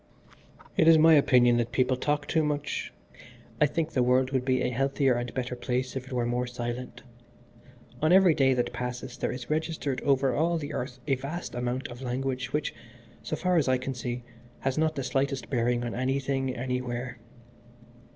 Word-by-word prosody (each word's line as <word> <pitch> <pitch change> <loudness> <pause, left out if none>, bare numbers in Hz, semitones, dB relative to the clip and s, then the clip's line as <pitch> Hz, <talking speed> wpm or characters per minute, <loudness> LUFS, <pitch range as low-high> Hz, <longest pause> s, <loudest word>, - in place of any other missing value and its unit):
"It 160 - +4
is 165 -1 +8
my 160 +1 +7
opinion 125 -5 +5
that 120 -1 -1
people 130 0 +2
talk 145 +3 -1
too 160 -2 +2
much. 150 -1 -2 0.7
I 150 - +6
think 160 +2 -2
the 130 - +1
world 130 +1 +3
would 130 -2 0
be 130 -1 +1
a - - 0
healthier 135 +1 +2
and 120 0 -3
better 125 -1 -2
place 125 +1 -2
if 130 -1 -5
it - - -12
were 125 -2 0
more 120 +1 -1
silent. 120 0 -5 1.0
On 155 +2 +3
every 185 -2 +7
day 135 -3 +3
that 120 -1 -1
passes 125 0 -5
there - - -2
is 125 +2 -6
registered 155 -4 -1
over 135 -1 +2
all 170 +3 +1
the 150 -1 -5
earth 125 0 -4
a 135 - +1
vast 140 +7 -4
amount 125 +1 -2
of 120 +1 -9
language 130 0 -2
which, 150 - -1 0.5
so - - -3
far 180 -1 +1
as 150 - +2
I 130 0 +3
can 130 +1 -4
see, 120 0 -4 0.4
has 135 -1 0
not 155 0 +1
the 135 - -2
slightest 135 +1 -1
bearing 120 -1 +1
on 120 - -3
anything 135 +1 -1
anywhere. 125 0 -3
130 Hz, 190 wpm, -28 LUFS, 125-145 Hz, 1.0 s, is